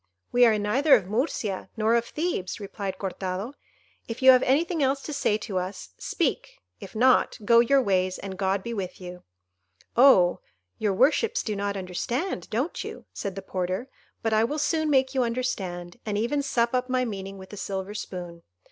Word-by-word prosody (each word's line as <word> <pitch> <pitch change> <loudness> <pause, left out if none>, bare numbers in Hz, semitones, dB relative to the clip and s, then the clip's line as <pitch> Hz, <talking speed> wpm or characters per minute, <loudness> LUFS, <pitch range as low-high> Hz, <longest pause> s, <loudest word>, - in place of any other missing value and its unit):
"We 245 0 +6
are 220 -2 +3
neither 260 +8 +4
of 205 -7 0
Murcia 210 - -2
nor 220 +1 +2
of 235 0 +2
Thebes," 300 - -3
replied 200 -1 -5
Cortado. 190 +4 -4 0.5
"If 230 +3 -6
you 260 - +10
have 255 -1 +5
anything 320 +5 +1
else 275 0 +1
to 300 - -5
say 270 -6 +1
to 205 -3 -3
us, 185 - -6
speak; - - -2 0.2
if 195 - -11
not, 255 +3 +4
go 235 +2 +6
your 265 +3 +4
ways, 185 -3 +1
and 195 -1 -6
God 190 0 0
be 235 - -4
with 190 -5 -5
you." 180 -1 -9 0.7
"Oh, 230 -9 +6 0.4
your 210 -2 +1
worships 415 - +2
do 215 - -2
not 200 0 -2
understand, 190 - -3
don't 255 +10 -2
you?" - - -8
said 195 -2 -4
the 195 - -6
porter; 185 +6 -3 0.3
"but 225 -1 +1
I 215 0 +4
will 290 +7 -1
soon 315 +1 +1
make 265 -2 +3
you 265 - +2
understand, 190 -8 -3
and 210 -2 -2
even 240 +7 0
sup 240 -4 0
up 255 0 0
my 255 0 +1
meaning 195 -3 -6
with 190 +1 -12
a - - -7
silver 195 +1 -4
spoon. 175 -4 -7
215 Hz, 185 wpm, -26 LUFS, 190-260 Hz, 0.7 s, you